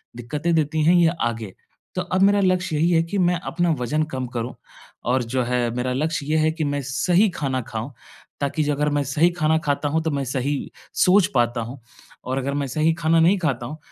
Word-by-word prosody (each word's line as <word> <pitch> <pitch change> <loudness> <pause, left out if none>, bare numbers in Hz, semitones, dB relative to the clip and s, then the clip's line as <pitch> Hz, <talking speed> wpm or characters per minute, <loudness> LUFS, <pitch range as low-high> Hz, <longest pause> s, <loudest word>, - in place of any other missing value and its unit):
दिक्कतें 150 +8 -2
देती 155 0 +1
हैं 170 +3 +5
ये 170 -2 +5 0.2
आगे। 110 -4 -6 0.4
तो 185 - 0
अब 180 +1 -1
मेरा 200 +1 +5
लक्ष्य 185 -2 +1
यही 160 +3 +2
है 165 - +4
कि 190 +4 -4
मैं 180 -1 +2
अपना 175 0 0
वजन 150 +6 0
कम 130 -1 -3
करूँ 120 +2 -3 0.6
और 130 -1 +2
जो 130 - +2
है 120 0 0
मेरा 125 +1 -1
लक्ष्य 155 +2 -1
ये 155 +2 +1
है 155 0 +3
कि 160 0 -3
मैं 145 -1 -1
सही 175 +9 +2
खाना 135 -6 -2
खाऊँ, 115 +3 -6 0.5
ताकि 140 +2 0
जो 145 0 0
अगर 150 +1 0
मैं 145 -1 0
सही 150 +6 +2
खाना 160 -2 +1
खाता 145 0 0
हूँ, 160 +2 +1
तो 160 - -1
मैं 140 -1 -1
सही 135 +2 -2 0.2
सोच 185 0 +4
पाता 120 0 +2
हूँ। 125 +4 -7 0.4
और 130 +1 -3
अगर 135 +1 -2
मैं 140 -1 -1
सही 155 +5 +1
खाना 165 0 +2
नहीं 175 +5 +4
खाता 135 -8 -1
हूँ, 150 +5 -7
150 Hz, 220 wpm, -22 LUFS, 130-165 Hz, 0.6 s, हैं